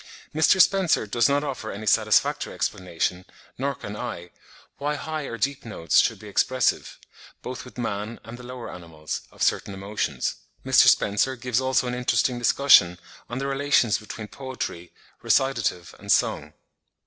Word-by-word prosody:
Mr. 155 +5 +4
Spencer 185 - +4
does 120 +3 +2
not 145 +1 +2
offer 130 -6 -4
any 105 +2 -7
satisfactory - - +2
explanation, 90 0 -2 0.4
nor 140 +1 -1
can 105 -6 -8
I, 95 -7 -6 0.5
why 145 +1 -1
high 155 0 -4
or 115 - -5
deep 140 +3 -1
notes 85 -9 +1
should - - +2
be 105 - -12
expressive, 125 +4 0 0.5
both 125 -5 -6
with 125 - -14
man 110 -1 -4
and 115 - -9
the 125 - -11
lower 125 -1 -8
animals, 80 -3 -6
of - - -4
certain 100 - 0
emotions. 95 -9 -3 0.3
Mr. - - +6
Spencer 105 +6 +3
gives 125 0 -1
also 130 0 +1
an 125 - -2
interesting 125 0 +1
discussion 120 -8 +5 0.3
on 120 - -4
the 135 - -3
relations 140 -5 +2
between 110 0 -8
poetry, 105 -6 -6 0.3
recitative 115 -10 0
and - - -3
song.) - - +1
120 Hz, 155 wpm, -25 LUFS, 100-135 Hz, 0.5 s, Mr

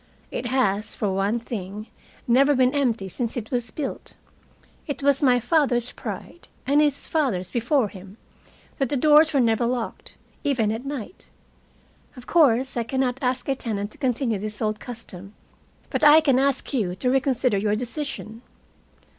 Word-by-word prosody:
It - - -3
has, 215 -5 0
for 205 -3 -1
one 195 +4 0
thing, 210 -3 -6 0.4
never 275 +4 +4
been 255 0 +3
empty 235 -9 0
since 230 +6 -3
it 220 -2 -5
was 240 -2 -1
built. 275 +3 -6 0.7
It 285 -2 -4
was 280 0 +3
my 250 -3 +4
father's 245 -2 +1
pride, 345 - -8 0.2
and 285 +3 +4
his 290 -2 +1
father's 250 - -1
before 240 +1 +1
him, 195 +1 -12 0.6
that 270 -3 +1
the 285 - +1
doors 305 +3 +6
were 285 - +2
never 230 -1 +2
locked, 245 -2 -4 0.3
even 240 -7 +1
at 225 +4 -5
night. 280 - -7 0.9
Of 250 - -11
course 265 -6 +3
I 240 - 0
can 245 +3 -3
not 260 -1 0
ask 250 -1 -1
a 275 - +2
tenant 215 -5 -4
to - - -16
continue 245 -5 0
this 210 +1 -6
old 215 -1 -1
custom, 205 -5 -10 0.6
but - - -1
I 300 +1 +9
can 275 -5 +3
ask 275 +1 0
you 195 -9 0
to 250 +7 0
reconsider 260 -5 +1
your 210 +1 +1
decision. 240 -2 -5
245 Hz, 165 wpm, -24 LUFS, 215-275 Hz, 0.9 s, I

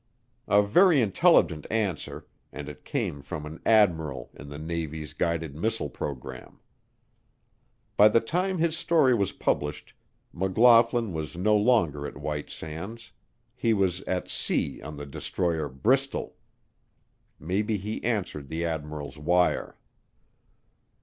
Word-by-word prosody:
A 105 0 +5
very 165 - +5
intelligent 105 - +3
answer 100 -8 -2 0.3
and 75 +1 -7
it 75 - -10
came 70 - -3
from 75 +2 -6
an 80 +2 -9
admiral 80 - +2
in 70 - -11
the 75 - -7
Navy's 80 -1 -5
guided 80 -4 -2
missile 95 - -2
program. 65 -2 -7 1.4
By 105 - +8
the 110 +2 +4
time 180 +10 -1
his 165 -1 +1
story 155 -6 +3
was 100 -5 +1
published, 75 +1 -2 0.4
McLaughlin 115 +3 +4
was 80 0 -5
no 105 +4 +3
longer 105 - +2
at - - -9
White 75 -1 -4
Sands; 95 +10 -8 0.4
he 115 -3 +1
was 95 -3 0
at 90 -1 -1
sea - - -1
on 75 +1 -8
the 75 - -6
destroyer 80 +2 -2
Bristol. 130 - 0 1.0
Maybe 105 +7 -1
he 105 +3 -5
answered 95 - -2
the 80 +4 -3
admiral's 75 -3 -5
wire. 90 +3 +1
90 Hz, 125 wpm, -27 LUFS, 75-110 Hz, 1.4 s, By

